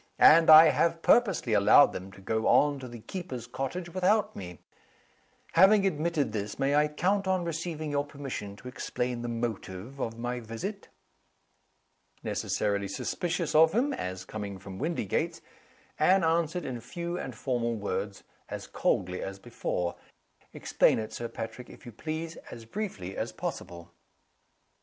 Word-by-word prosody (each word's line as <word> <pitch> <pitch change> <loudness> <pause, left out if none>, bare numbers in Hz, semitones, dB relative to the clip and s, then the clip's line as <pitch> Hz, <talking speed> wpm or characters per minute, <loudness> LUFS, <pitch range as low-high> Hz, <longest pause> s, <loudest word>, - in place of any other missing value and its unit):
And 165 +1 +7
I 155 +1 +11
have 165 0 +1
purposely 195 - +3
allowed 105 +7 +6
them 95 +1 -7
to 95 - -14
go 110 +3 -1
on 145 -1 +4
to 130 - -7
the 120 -2 -10
keeper's 130 - -6
cottage 135 +8 -4
without 205 +3 +2
me. 90 -3 -8 0.9
Having 195 +3 +6
admitted 165 -3 0
this, 105 -1 -4
may 135 +1 +1
I 150 +1 +4
count 190 +6 0
on 185 -2 +1
receiving 165 -2 -4
your 145 0 +1
permission 135 -8 -6
to 125 - -12
explain 125 -1 -3
the 120 - -4
motive 115 0 -5
of 115 -3 -3
my 120 +1 -3
visit?" 120 - -6 1.4
Necessarily 100 -1 -1
suspicious 170 - -2
of 160 +2 +6
him, 265 +6 +1
as 95 - -5
coming 100 -1 -6
from 95 0 -9
Windygates, 155 - -1 0.6
Anne 190 0 +4
answered 165 +1 +1
in 125 -3 -5
few 170 +8 -5
and 130 - -6
formal 120 -1 -1
words, 100 -1 -4 0.3
as - - -6
coldly 90 0 -1
as 95 0 -5
before. 95 -5 -3 0.6
"Explain - - +2
it, 110 -1 -5
Sir 120 - -4
Patrick, 115 +2 -7
if - - -14
you 120 - -8
please, 160 +7 -5
as 115 -1 -10
briefly 110 - -5
as - - -3
possible." 85 0 -6
130 Hz, 150 wpm, -29 LUFS, 110-165 Hz, 1.4 s, I